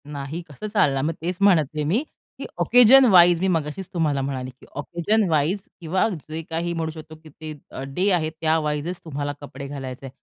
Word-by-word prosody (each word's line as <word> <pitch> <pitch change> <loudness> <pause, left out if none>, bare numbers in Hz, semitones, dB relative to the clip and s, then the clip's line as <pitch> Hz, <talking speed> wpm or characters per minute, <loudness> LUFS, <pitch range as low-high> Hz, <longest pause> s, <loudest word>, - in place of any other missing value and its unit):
नाही 145 +3 -6
कसं 150 +9 -7
चालणार? 140 -10 +2
मग 160 +2 0
तेच 175 +2 -3
म्हणत 190 -6 +5
आहे 150 - -1
मी, 205 - +1 0.4
की - - -5 0.2
ओकेशनवाईज 220 -9 +7
मी 190 - +1
मगाशीच 165 +1 -2
तुम्हाला 155 -5 0
म्हणाले, 130 -1 -4
की 130 0 -17
ओकेशनवाईज 170 +1 0 0.2
किंवा 175 +5 +1 0.2
जे 160 +1 -4
काही 170 +1 -2
म्हणू 165 -1 -3
शकतो 155 0 -11
की 155 - -13
ते 155 +1 -9 0.2
अ, - - -7
डे 160 +9 0
आहेत 160 -3 +1
त्या 160 0 +2
वाईजचं 150 +3 -3
तुम्हाला 145 -2 -3
कपडे 140 -1 -8
घालायचे. 135 -1 -7
160 Hz, 180 wpm, -23 LUFS, 145-180 Hz, 0.4 s, ओकेशनवाईज